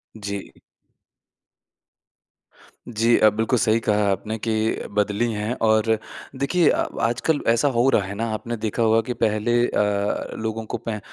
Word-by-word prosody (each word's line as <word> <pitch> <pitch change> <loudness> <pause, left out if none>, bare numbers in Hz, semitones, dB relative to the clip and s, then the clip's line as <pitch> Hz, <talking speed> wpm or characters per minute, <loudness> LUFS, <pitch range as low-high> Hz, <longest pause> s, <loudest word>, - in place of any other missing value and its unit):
जी। 100 -2 -6 2.4
जी 115 0 +2
अ, 110 - +6
बिल्कुल 110 +4 0
सही 115 -1 +2
कहा 105 -2 0
है 100 - +2
आपने 105 +3 -3
के 110 - +1 0.4
बदली 105 +3 +1
हैं 105 +2 -2
और 110 0 +3 0.4
देखिए 150 +4 +2
अ, - - +1 0.2
आजकल 125 +7 0
ऐसा 115 +5 +3
हो 120 +3 +4
रहा 120 - +3
है 95 +1 -6
ना 115 +3 -2
आपने 115 +2 -4
देखा 110 +2 -1
होगा 115 0 +4
कि - - 0
पहले 110 +1 0
अ, 100 0 -1
लोगों 110 0 -4
को - - -4
पैं 110 -2 -5
110 Hz, 155 wpm, -23 LUFS, 105-115 Hz, 2.4 s, अ